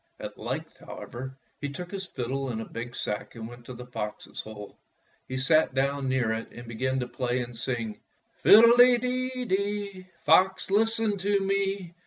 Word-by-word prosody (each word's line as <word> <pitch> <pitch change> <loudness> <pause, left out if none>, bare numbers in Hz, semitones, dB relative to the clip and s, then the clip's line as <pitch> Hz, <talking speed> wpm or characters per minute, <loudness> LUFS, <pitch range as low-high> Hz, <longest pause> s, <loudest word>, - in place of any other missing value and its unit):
At - - -6
length, - - -5
however, 130 +2 -8 0.2
he 145 - -3
took 175 +6 -7
his 195 -1 -4
fiddle 135 -1 -3
and 115 -2 -3
a 115 - -4
big 120 +1 -7
sack 105 +3 -3
and 110 -1 -6
went 120 0 -12
to 130 - -7
the 125 +1 -8
fox's 105 -4 -5
hole. 105 -1 -10 0.5
He 130 - -3
sat 145 +1 +3
down 135 0 +1
near 130 -4 +1
it 110 0 -4
and 120 0 -10
began 130 +3 -1
to 125 - -3
play 125 0 -1
and 120 0 -6
sing: 115 -2 -3 0.2
— - - -38
"Fiddle 230 +3 +9
de 245 0 +8 0.5
dee, 200 -2 -2 0.2
Fox, 190 +1 +4
listen 225 0 +2
to 200 +2 +2
me! 195 -2 -1
135 Hz, 180 wpm, -28 LUFS, 120-195 Hz, 0.5 s, Fiddle